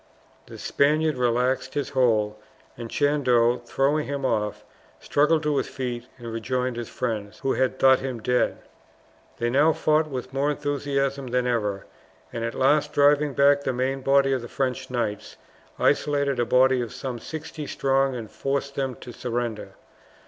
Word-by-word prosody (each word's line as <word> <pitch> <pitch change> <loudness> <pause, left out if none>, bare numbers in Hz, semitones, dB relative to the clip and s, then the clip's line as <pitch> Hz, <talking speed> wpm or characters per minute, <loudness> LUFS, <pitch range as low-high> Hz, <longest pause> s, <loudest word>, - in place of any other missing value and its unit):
The - - -10
Spaniard 155 +2 +1
relaxed 125 +2 0
his 145 -2 -1
hold, 110 -5 +2 0.4
and 115 -1 -7
Chandos, 125 -5 +2
throwing 145 +5 +1
him 140 -1 -3
off, 105 -4 -1 0.3
struggled 155 +2 +2
to 150 -1 +1
his - - 0
feet 125 -2 -5
and 115 -2 -7
rejoined 125 +2 -2
his 120 -1 -5
friends, 110 -4 -4
who 135 - +1
had 130 0 0
thought 130 -1 +5
him 130 -3 -4
dead. 125 +2 +1 0.8
They 120 0 -1
now 150 +5 +4
fought 155 +1 +2
with 130 -2 -6
more 140 +2 +1
enthusiasm 140 -2 -1
than 125 0 0
ever, 105 -5 -1 0.5
and 115 - -3
at 115 - -3
last, 150 +3 +2
driving 145 0 +3
back 140 0 +5
the 130 - -1
main 130 +2 -1
body 135 0 +3
of 130 - -1
the 120 - -7
French 130 +1 -2
knights, 120 -5 -3 0.4
isolated 140 -3 +1
a 120 - +2
body 130 +1 +4
of 120 - -5
some 130 -2 -5
sixty 155 +2 -7
strong, 135 -1 +1
and 115 -3 -7
forced 140 0 -2
them 135 -2 -2
to 125 - -8
surrender. 120 -2 -4
130 Hz, 165 wpm, -25 LUFS, 120-140 Hz, 0.8 s, thought